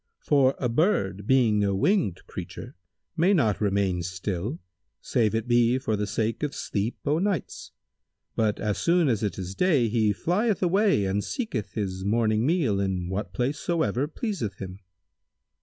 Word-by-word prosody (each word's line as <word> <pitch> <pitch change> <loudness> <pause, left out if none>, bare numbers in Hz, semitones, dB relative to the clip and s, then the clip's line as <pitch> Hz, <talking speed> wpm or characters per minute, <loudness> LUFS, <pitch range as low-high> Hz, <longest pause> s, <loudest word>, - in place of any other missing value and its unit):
For 140 - +3
a 125 - -1
bird, 115 - 0
being 115 -6 +3
a 100 -1 +1
winged 165 - +1
creature, - - -8 0.4
may 180 +4 +3
not 110 - +1
remain 100 -3 +1
still, 90 - -3 0.4
save 110 -2 0
it 115 +1 -2
be 120 +1 +3
for 110 -4 -1
the 105 0 -2
sake 110 +2 -1
of 150 -2 -2
sleep 105 +3 -2
o' 150 +2 +2
nights; 190 -6 -2 0.6
but, 110 -2 +1
as 105 -2 -1
soon 170 -1 +3
as 110 -4 0
it 105 -3 -2
is 95 -1 -5
day, 140 - +2
he 110 -2 +2
flieth 190 - 0
away 190 - +3
and 100 +2 0
seeketh 175 - -4
his 95 -3 -3
morning 110 +2 +1
meal 145 - +1
in 95 -2 -1
what 95 -1 -3
place 125 +9 -1
soever 145 - 0
pleaseth 155 - -4
him." 95 -1 -8
115 Hz, 160 wpm, -26 LUFS, 100-150 Hz, 0.6 s, For